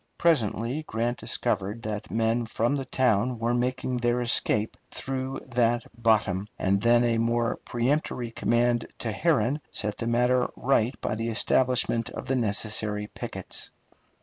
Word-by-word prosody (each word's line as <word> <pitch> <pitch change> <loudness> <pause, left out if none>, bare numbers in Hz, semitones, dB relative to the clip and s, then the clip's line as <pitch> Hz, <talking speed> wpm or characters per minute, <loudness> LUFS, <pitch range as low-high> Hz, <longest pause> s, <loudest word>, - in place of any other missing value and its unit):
Presently 130 -4 +1
Grant 120 +2 -1
discovered 105 +5 -2
that 110 0 -4
men 115 +1 0
from 120 +5 0
the 135 -2 -2
town 125 -1 +1
were 115 +1 0
making 125 +1 -1
their 120 0 +1
escape 115 -2 +2
through 130 0 -4
that 120 -1 +2
bottom, 105 -4 +2
and 100 +1 +1
then 120 +1 +5
a 115 -1 +2
more 115 0 +1
peremptory 120 -1 -1
command 120 0 +1
to 115 - -3
Herron 145 - +1
set 105 -1 -3
the 115 - -2
matter 125 +1 +2
right 125 -2 +1
by - - -1
the 115 +1 -2
establishment 120 0 +1
of - - -7
the 135 - 0
necessary 105 -2 -1
pickets. - - -4
120 Hz, 145 wpm, -27 LUFS, 110-125 Hz, -, then